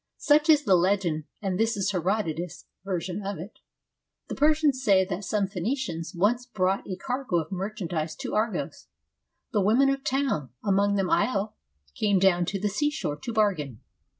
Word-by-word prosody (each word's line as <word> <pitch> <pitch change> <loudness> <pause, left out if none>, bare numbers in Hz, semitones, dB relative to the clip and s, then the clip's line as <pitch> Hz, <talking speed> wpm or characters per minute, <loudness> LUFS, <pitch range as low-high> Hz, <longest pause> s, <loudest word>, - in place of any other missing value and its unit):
Such 300 +2 +3
is 300 -2 +6
the 200 - +3
legend, 175 -4 +1 0.2
and 190 -2 -1
this 225 0 +1
is 195 +1 0
Herodotus' 180 -3 -2 0.2
version 185 0 -3
of 200 -1 -4
it: 180 +7 -10 0.7
The - - -3
Persians 300 -3 +2
say 195 -5 +4
that 190 +1 -4
some 205 0 0
Phoenicians 190 - -3
once 235 +7 +1
brought 195 -5 -1
a 185 - -2
cargo 250 +1 -3
of 160 0 -3
merchandise 180 -5 -3
to - - -6
Argos. 215 +1 -2 0.7
The 210 - +3
women 235 +8 +4
of 275 0 0
the - - -32
town, 265 - -1
among 200 0 +2
them 195 -2 0
Io, 210 -3 +1 0.4
came 205 -2 +2
down 180 -2 +3
to 195 +3 -3
the 210 - 0
seashore 295 - -1
to 235 - -6
bargain. 180 - 0
200 Hz, 170 wpm, -26 LUFS, 180-235 Hz, 0.7 s, is